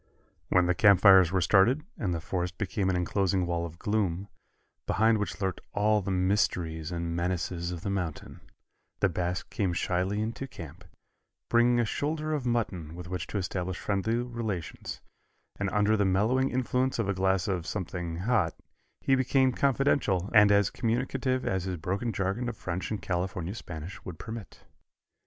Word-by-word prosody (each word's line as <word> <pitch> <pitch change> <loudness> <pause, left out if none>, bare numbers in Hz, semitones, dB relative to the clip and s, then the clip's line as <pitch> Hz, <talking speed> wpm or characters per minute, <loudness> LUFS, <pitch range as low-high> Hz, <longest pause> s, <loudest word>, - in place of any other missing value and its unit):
When 90 -1 +4
the 90 - +3
campfires 95 -3 +7
were 95 -1 +1
started, 110 - +4
and 95 -5 -2
the 85 - -1
forest 90 +1 -3
became 95 -1 -1
an 95 - +1
enclosing 95 +1 +1
wall 85 -1 -1
of 85 0 -13
gloom, 100 -2 -1 0.6
behind 110 +3 +3
which 100 -4 -3
lurked 95 -3 -2
all 105 +1 +3
the 100 - -4
mysteries 90 -4 0
and 85 -1 -3
menaces 85 0 -2
of 85 -2 -5
the 100 - -3
mountains, 90 -6 -4 0.6
the 100 - +3
Basque 90 +1 -3
came 95 -4 0
shyly 95 +4 0
into 115 +5 -3
camp, 85 - -10 0.6
bringing 120 +1 +4
a 120 - +3
shoulder 155 +6 -2
of 140 -5 -2
mutton 95 -10 -2
with 90 0 -8
which 90 -2 -4
to - - -3
establish 90 -1 -3
friendly 100 +3 0
relations, 115 -7 -4 0.6
and 100 -1 0
under 105 +1 +2
the 105 - +2
mellowing 110 +8 +2
influence 130 +1 0
of 115 -4 0
a 100 - +1
glass 95 -1 +1
of 90 -3 -2
something 90 -4 -4
hot 110 +5 +1 0.5
he 135 - +2
became 130 0 +3
confidential 125 -8 +1
and 105 -2 +7
as 100 -1 +4
communicative 130 +2 -1
as 95 -1 -1
his 95 -2 -3
broken 95 +8 -2
jargon 100 +5 -1
of - - -7
French 90 0 -4
and 105 -2 -4
California 90 0 -2
Spanish 85 -4 -8
would 90 -4 -7
permit. 110 -1 -8
95 Hz, 165 wpm, -29 LUFS, 90-115 Hz, 0.6 s, campfires